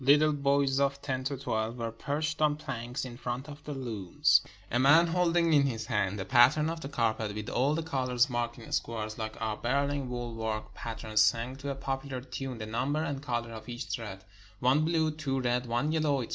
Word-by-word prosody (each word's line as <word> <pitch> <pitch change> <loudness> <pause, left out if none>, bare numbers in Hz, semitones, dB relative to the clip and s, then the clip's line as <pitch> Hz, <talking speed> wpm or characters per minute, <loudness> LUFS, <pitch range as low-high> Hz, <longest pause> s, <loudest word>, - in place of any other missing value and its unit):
Little 150 +3 +5
boys 140 -1 +2
of 140 0 +1
ten 130 -2 -3
to 140 0 -1
twelve 110 -2 -2
were 115 -1 -3
perched 150 +7 -2
on 150 -1 +4
planks 120 -4 -4
in 120 -2 -8
front 125 +2 -4
of 150 0 -10
the 150 - -4
looms; 115 - +2 0.3
a 120 - +2
man, 145 +6 +7
holding 170 -1 +2
in 140 -2 +5
his 115 -4 -3
hand 100 -2 0
the 95 - -4
pattern 130 - +5
of 165 0 -6
the 135 - -5
carpet 110 -5 0
with 105 0 -4
all 140 +5 +2
the 165 - -1
colors 130 -4 +1
marked 120 -2 -2
in 115 - -11
squares, 110 -2 -2
like 110 0 -4
our 110 -1 -2
Berlin 140 +1 0
wool 120 -1 -4
work 110 -1 -3
patterns, 110 -2 -1
sang 115 +4 +2
to 140 +1 -5
a 140 - -2
popular 135 -1 -3
tune 130 0 -6
the 110 - -5
number 130 +8 -1
and 140 -3 -3
color 120 -4 -2
of 110 +2 -9
each 120 0 -4
thread 100 -5 -5 0.2
— 105 0 -25
one 145 +4 +4
blue, 160 -1 +2
two 140 -3 -2
red, 125 0 0
one 120 +6 0
yellow, 150 -4 +1
etc. - - -8
130 Hz, 215 wpm, -30 LUFS, 115-145 Hz, 0.3 s, man